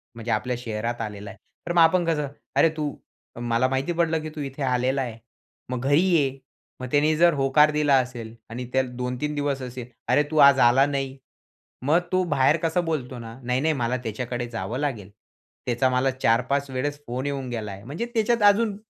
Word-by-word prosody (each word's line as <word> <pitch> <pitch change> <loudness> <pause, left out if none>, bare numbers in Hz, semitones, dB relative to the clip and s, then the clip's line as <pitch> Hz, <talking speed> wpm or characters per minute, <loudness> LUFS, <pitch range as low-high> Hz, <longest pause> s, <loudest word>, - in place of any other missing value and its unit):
म्हणजे 115 0 -4
आपल्या 125 +4 0
शहरात 115 0 -3
आलेला 105 -2 -6
आहे. 100 - -11 0.3
तर 175 - -1
मग 175 - +3
आपण 175 +2 +4
कसं, 150 -3 0 0.3
अरे, 165 - +5
तू 150 -2 -2 0.5
मला 120 +1 +1
माहिती 135 +5 -1
पडलं 165 -2 +1
की 155 - -5
तू 150 - -5
इथे 140 0 -5
आलेला 130 +1 +1
आहे. 120 -4 -5 0.5
मग 125 -1 -3
घरी 145 +3 +4
ये 150 -8 +2 0.4
मग 130 - -5
त्याने 150 +2 +3
जर 170 0 +5
होकार 145 +2 +4
दिला 150 -2 +3
असेल 115 -3 -9 0.2
आणि 125 +2 -5
त्याला 130 -1 +1
2-3 125 +4 -3
दिवस 145 -2 -1
असेल, 125 -1 -7 0.2
अरे, 135 +5 +4
तू 155 - -1
आज 140 -1 +6
आला 125 +3 +5
नाही? 135 -1 -3 0.7
मग 160 +4 +4
तो 185 0 +2
बाहेर 135 +4 +4
कसं 165 +1 +1
बोलतो 130 -6 -3
ना, 115 +1 -9
"नाही, 125 +2 0
नाही, 160 0 +2
मला 125 -1 -1
त्याच्याकडे 120 +2 -4
जावं 120 +1 -4
लागेल. 120 -10 -3 0.6
त्याचा 125 +2 +1
मला 130 +1 +1
4-5 130 +3 +1
वेळेस 145 +3 -3
फोन 125 +3 -3
येऊन 135 -3 -3
गेलाय." 105 -4 -5
म्हणजे 150 - -4
त्याच्यात 230 0 +1
अजून 210 0 -1
135 Hz, 190 wpm, -24 LUFS, 120-150 Hz, 0.7 s, आज